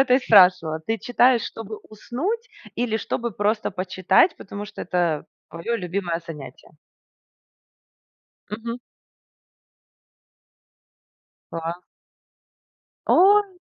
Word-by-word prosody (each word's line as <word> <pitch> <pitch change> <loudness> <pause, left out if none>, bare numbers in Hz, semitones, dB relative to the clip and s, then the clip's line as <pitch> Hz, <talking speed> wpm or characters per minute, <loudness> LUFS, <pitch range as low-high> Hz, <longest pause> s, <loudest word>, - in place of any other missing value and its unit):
это 265 -2 +4
и - - +5
спрашивала. 180 -9 +5
Ты 225 0 -1
читаешь, 245 0 +3
чтобы 220 -1 -7
уснуть, 350 - -4 0.3
или 235 -2 -1
чтобы 235 +1 -3
просто 210 +3 0
почитать, 185 - +2
потому 205 +1 -7
что 210 - -10
это 170 -4 -1 0.2
твое 165 +9 -3
любимое 180 -3 -3
занятие? 150 -5 -10 1.7
Мгм. 230 +3 -5 2.7
Да. 165 +1 -4 1.3
Ой. 400 0 +5
210 Hz, 90 wpm, -23 LUFS, 180-245 Hz, 2.7 s, и